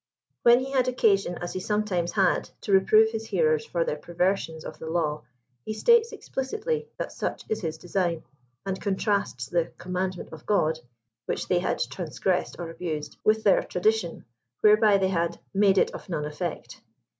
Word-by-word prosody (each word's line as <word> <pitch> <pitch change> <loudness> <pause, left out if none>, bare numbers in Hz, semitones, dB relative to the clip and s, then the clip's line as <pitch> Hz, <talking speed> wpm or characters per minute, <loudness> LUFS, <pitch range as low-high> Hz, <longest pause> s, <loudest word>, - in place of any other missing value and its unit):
When 240 +1 +6
he 270 +1 -5
had 260 -2 +2
occasion, 200 -7 +2
as 175 - -4
he 185 - -3
some 210 +3 0
times 175 -4 -1
had, 190 -4 +2
to - - -4
reprove 215 +3 +5
his 225 0 -4
hearers 155 -6 +2
for 170 -1 0
their 150 - -2
perversions 175 -1 -1
of - - -8
the 160 - -6
law, 155 -3 0 0.4
he 215 - -4
states 470 - +4
explicitly 445 - -3
that - - -4
such - - -4
is 220 0 -1
his 160 -4 -3
design, 175 -2 -1 0.4
and 190 -1 -3
contrasts 200 - -1
the 170 +5 0
commandment 180 -1 -4
of 155 - -12
Ood" 160 -6 +2 0.5
which - - -2
they 180 - +2
had 180 - -1
transgressed 180 +1 -2
or 170 -1 -5
abused, 165 -3 -5
with 220 +1 +3
their 200 - +5
"ttadition" 195 -1 0 0.4
whereby 210 -1 +6
they 190 -1 +1
had 170 -2 -1
"made 195 -1 +4
it - - +3
of - - -10
none 155 -4 -2
effect." 150 0 -5
190 Hz, 175 wpm, -26 LUFS, 170-215 Hz, 0.5 s, When